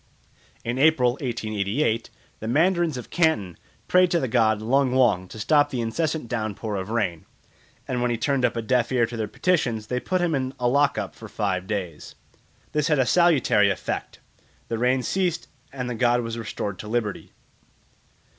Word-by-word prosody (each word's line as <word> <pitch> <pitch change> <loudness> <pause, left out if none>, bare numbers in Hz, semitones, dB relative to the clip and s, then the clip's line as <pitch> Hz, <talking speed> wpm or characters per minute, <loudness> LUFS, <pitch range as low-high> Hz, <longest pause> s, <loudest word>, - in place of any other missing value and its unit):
In 120 +2 -2
April 135 -5 +4
1888 115 -1 -2 0.3
the 110 - -6
mandarins 165 +3 +2
of 125 - -9
Canton 115 - +1 0.3
prayed 180 0 +4
to 170 - +2
the 130 - -1
god 110 -3 +2
Lung 130 +4 +2
wong 115 -8 +3
to 110 - -11
stop 145 +6 +3
the 130 - -3
incessant 150 +5 -2
downpour 110 -2 -3
of 95 +1 -4
rain; 100 -8 -1 0.6
and 125 -1 -2
when 125 - +1
he 120 - 0
turned 140 +1 0
a 120 -1 +1
deaf 125 +1 +1
ear 125 -2 +3
to 120 - -7
their 110 -2 -2
petitions 120 - 0
they 125 +3 -2
put 185 +7 -1
him 175 -2 +1
in 130 -1 -2
a 125 - +1
lock 140 +1 +2
up 105 -3 -3
for 110 - -11
five 95 -4 -2
days. 90 -7 -5 0.6
This 150 -1 0
had 150 -2 +2
a 130 - +3
salutary 145 - +4
effect. - - -4 0.5
The 115 - -2
rain 125 +1 +2
ceased 185 +1 -1 0.2
and 125 -2 -4
the 125 - -3
god 120 +1 +2
was 115 -1 -4
restored 105 -3 -5
to 105 - -7
liberty. 110 -2 -3
120 Hz, 180 wpm, -24 LUFS, 110-140 Hz, 0.6 s, April